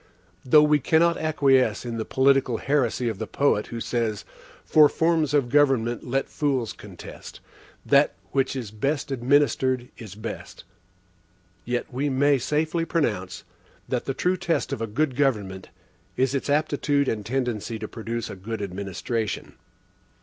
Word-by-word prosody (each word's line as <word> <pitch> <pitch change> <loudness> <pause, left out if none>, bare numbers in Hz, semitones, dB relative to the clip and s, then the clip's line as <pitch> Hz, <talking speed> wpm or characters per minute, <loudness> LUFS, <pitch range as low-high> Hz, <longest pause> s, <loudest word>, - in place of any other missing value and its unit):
Though 150 +4 +6
we 150 0 +4
cannot 165 +4 +3
acquiesce 140 -6 +2
in 115 -1 -4
the 110 - -3
political 130 -3 +2
heresy 130 -3 0
of 110 -4 -3
the - - -4
poet 140 -7 +1
who 115 - -6
says: 115 -3 -2 0.4
"For 150 -2 +6
forms 160 -3 +1
of 145 -4 +2
government 130 -4 +2
let 135 +2 -1
fools 135 -6 -1
contest - - -11 0.5
That - - +4 0.2
which 135 0 0
is 120 -6 -5
best 140 +7 -2
administered 130 -1 +1
is 105 -5 -9
best," 110 +2 -8 1.0
yet 120 +1 -3
we 140 +3 0
may 140 +1 +3
safely 155 +6 0
pronounce, 105 - -2 0.4
that 125 - -2
the 135 - -3
true 180 +6 +1
test 170 -1 -1
of - - -4
a 115 - -1
good 130 +5 -1
government 105 -9 -1 0.5
is 130 +1 +1
its 140 0 -2
aptitude 145 -1 +1
and 105 -2 -1
tendency 120 -2 -2
to 110 0 -6
produce 115 0 -5
a - - -7
good 105 +3 -5
administration. 100 +3 -4
130 Hz, 150 wpm, -25 LUFS, 115-145 Hz, 1.0 s, Though